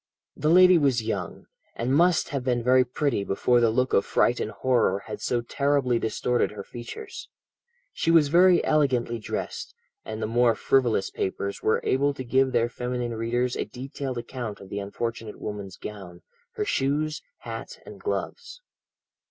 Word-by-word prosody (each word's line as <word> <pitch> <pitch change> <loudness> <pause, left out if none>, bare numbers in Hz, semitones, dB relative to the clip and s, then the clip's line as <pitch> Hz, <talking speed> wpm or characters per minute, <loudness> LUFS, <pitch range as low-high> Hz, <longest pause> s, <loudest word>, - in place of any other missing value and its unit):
"The 150 - 0
lady 180 +1 +7
was 130 -6 +2
young, 100 -6 -4 0.3
and 120 +3 -1
must 170 +3 +3
have 140 -3 -3
been 120 -2 0
very 130 +1 +5
pretty 125 -3 -1
before 120 +5 +2
the 115 -1 +4
look 125 +3 0
of 100 - +4
fright 120 - +2
and - - -2
horror 110 -4 +1
had 105 - -7
so 120 - 0
terribly 135 -1 +1
distorted 120 +2 0
her 105 -1 -8
features. 130 - -9 0.6
She 165 - -1
was 165 -4 +5
very 175 +2 +5
elegantly 125 -6 +1
dressed, 110 - -5 0.3
and 110 0 -6
the 110 - -1
more 115 +1 +3
frivolous 120 -5 +1
papers 100 +1 -3
were 110 - +2
able 140 +2 +1
to 130 - -5
give 130 +2 +2
their 120 -2 +2
feminine 125 0 -3
readers 120 +2 -1
a - - -2
detailed 130 0 -6
account 120 -3 -5
of 100 - -12
the 100 - -4
unfortunate 110 +2 -5
woman's 100 -3 -6
gown, 95 -4 -9 0.3
her 425 -3 -2
shoes, 150 - 0 0.2
hat, - - -7
and - - -11
gloves. 430 +3 -4
125 Hz, 165 wpm, -26 LUFS, 110-140 Hz, 0.6 s, lady